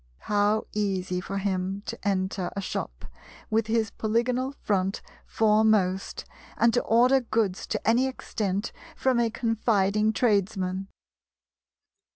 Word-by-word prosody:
How 210 Hz, +1 st, +2 dB
easy 190 Hz, -3 st, -1 dB
for 195 Hz, +2 st, -5 dB
him 195 Hz, 0 st, -2 dB
to -, -, -4 dB
enter 190 Hz, -2 st, -1 dB
a -, -, -2 dB
shop -, -, -5 dB, 0.5 s
with 220 Hz, 0 st, +1 dB
his 220 Hz, -2 st, 0 dB
polygonal 240 Hz, +4 st, 0 dB
front 195 Hz, -1 st, 0 dB, 0.2 s
foremost, 215 Hz, -3 st, +2 dB, 0.3 s
and 235 Hz, 0 st, +4 dB
to 245 Hz, -, +3 dB
order 250 Hz, +4 st, +4 dB
goods 220 Hz, -5 st, -1 dB
to -, -, -3 dB
any 240 Hz, +4 st, +4 dB
extent 205 Hz, -6 st, -3 dB, 0.2 s
from 260 Hz, -2 st, +1 dB
a 235 Hz, -1 st, +2 dB
confiding 215 Hz, -3 st, +1 dB
tradesman! 195 Hz, -4 st, 0 dB
210 Hz, 120 wpm, -26 LUFS, 195-225 Hz, 0.5 s, and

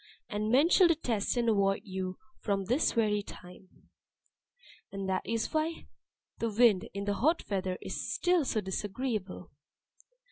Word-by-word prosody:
And 210 Hz, +1 st, -2 dB
men 270 Hz, +7 st, +5 dB
shall 365 Hz, 0 st, +6 dB
detest 250 Hz, -10 st, 0 dB
and 235 Hz, -1 st, +1 dB
avoid 200 Hz, -3 st, +2 dB
you 185 Hz, -2 st, -4 dB, 0.2 s
from 195 Hz, -2 st, -1 dB
this 250 Hz, -, +2 dB
very 210 Hz, -2 st, +2 dB
time." 185 Hz, -1 st, -14 dB, 1.0 s
(And 195 Hz, -1 st, -4 dB
that 190 Hz, -1 st, 0 dB
is 230 Hz, -1 st, -2 dB
why 315 Hz, +1 st, -1 dB, 0.5 s
the 230 Hz, -, 0 dB
Wind 220 Hz, -3 st, +3 dB
in 200 Hz, 0 st, -3 dB
the 205 Hz, -, 0 dB
hot 310 Hz, +11 st, +1 dB
weather 185 Hz, -2 st, -1 dB
is -, -, -4 dB
still 350 Hz, +7 st, +2 dB
so 225 Hz, -5 st, -1 dB
disagreeable.) 205 Hz, 0 st, -4 dB
210 Hz, 145 wpm, -30 LUFS, 195-245 Hz, 1.0 s, shall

